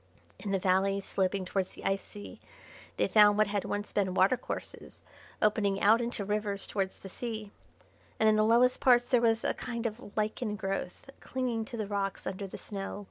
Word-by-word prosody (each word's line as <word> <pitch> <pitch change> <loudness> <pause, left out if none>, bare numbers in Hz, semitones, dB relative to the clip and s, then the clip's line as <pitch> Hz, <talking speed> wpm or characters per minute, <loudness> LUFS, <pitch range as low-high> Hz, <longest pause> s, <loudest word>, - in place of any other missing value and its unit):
In 205 - -5
the 195 - +2
valley 190 +1 +2
sloping 190 -1 -1
towards 185 0 -1
the - - -11
ice 195 0 +1
sea 205 0 -11 0.6
they - - +2
found 210 -1 +6
what 215 - +5
had 205 -1 -2
once 205 0 -4
been 190 -3 0
watercourses 200 +7 -1 0.4
opening 205 -2 +2
out 220 +4 +5
into 235 -4 -3
rivers 205 -1 -1
towards 195 -2 -2
the - - -10
sea; 215 0 -6 0.7
and 220 - +4
in 215 - +5
the 215 - +4
lowest 240 +3 +4
parts 245 -1 +5
there 245 -2 +3
was 225 -1 +2
a - - +1
kind 235 -1 -5
of 220 -1 -5
lichen 215 +1 -1
growth 195 0 -4
clinging 245 -4 -2
to 235 - -7
the 215 - -2
rocks 200 -1 -3
under 195 +1 -4
the - - -8
snow. 195 0 -5
210 Hz, 190 wpm, -30 LUFS, 195-225 Hz, 0.7 s, found